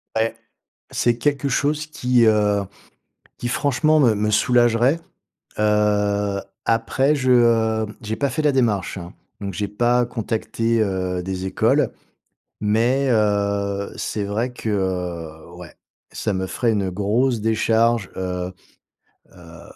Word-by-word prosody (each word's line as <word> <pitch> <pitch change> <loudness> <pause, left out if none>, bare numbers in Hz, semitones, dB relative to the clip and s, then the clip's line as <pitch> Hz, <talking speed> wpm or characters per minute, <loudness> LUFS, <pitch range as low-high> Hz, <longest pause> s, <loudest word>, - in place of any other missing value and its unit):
Ouais. 110 +1 0 0.6
C'est 120 -1 +1
quelque 140 +2 0
chose 145 +3 0
qui, 125 -5 +2
heu, 105 -2 +3 0.8
qui 120 - -3
franchement, 145 +4 +2
me 120 -6 +4
me 105 +1 0
soulagerait. 120 +6 +3 0.6
Heu, 105 -1 +1 0.2
après 130 +5 +2
je, 130 -3 +1
heu, 115 -2 +3 0.2
j'ai 110 -1 -3
pas 140 +3 0
fait 130 +4 -2
la 150 -1 +3
démarche, 110 -9 0
hein, 85 -1 -8 0.3
donc 100 -1 -4
j'ai 105 +3 -2
pas 120 +4 +1
contacté, 115 0 -1
heu, 95 -3 -1
des 95 0 -4
écoles. 95 - +2 0.7
Mais 120 +6 +2
heu, 100 -2 0
c'est 105 - -3
vrai 110 +5 -2
que, 120 - -6
heu, 90 -5 -3
ouais, 90 -2 -11 0.4
ça 110 - -2
me 95 -1 -2
ferait 115 +4 0
une 100 -3 -1
grosse 110 +6 0
décharge, 115 0 +1
heu 90 -1 -3 0.8
heu 85 -2 -14
110 Hz, 130 wpm, -21 LUFS, 100-120 Hz, 0.8 s, me